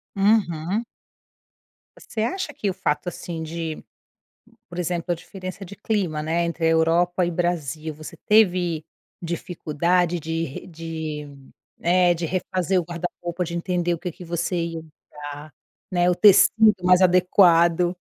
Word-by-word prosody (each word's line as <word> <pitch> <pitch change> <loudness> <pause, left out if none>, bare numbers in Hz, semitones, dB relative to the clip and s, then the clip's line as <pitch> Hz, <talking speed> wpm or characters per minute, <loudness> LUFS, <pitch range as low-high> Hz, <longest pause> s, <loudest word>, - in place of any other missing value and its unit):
Uhum. 200 0 +1 1.1
Você 220 - -6
acha 310 - -2
que 205 - -2
o - - -2
fato, 175 -3 -2
assim 170 -2 -7
de, 160 -1 -5 0.9
por 175 - -6
exemplo, 175 0 -2
a - - +1
diferença 185 +2 -8
de 200 - -10
clima, 185 -10 -1
né, 170 +2 0
entre 170 0 -2
a 160 - +4
Europa 170 +3 +2
e 175 - -2
Brasil, 160 -3 -2
você 155 +2 -10
teve 180 -7 +3 0.4
dificuldade 170 +1 -1
de 165 +1 -3
re 135 - -8
de, 160 -3 -6 0.5
né, 175 +1 +3
de 170 0 -3
refazer 185 +2 0
o 175 - -2
guarda-roupa, 175 +1 -4
de 170 0 -5
entender 175 0 -1
o 165 - -4
que 180 -1 -4
que 180 - -12
você 170 +1 -2
ia 170 -1 -2
usar, 150 -1 -11 0.4
né, 175 -1 +3
o 180 - +2
tecido 215 +2 +6
mais 180 0 +5
adequado? 180 -1 +4
175 Hz, 145 wpm, -23 LUFS, 165-180 Hz, 1.1 s, tecido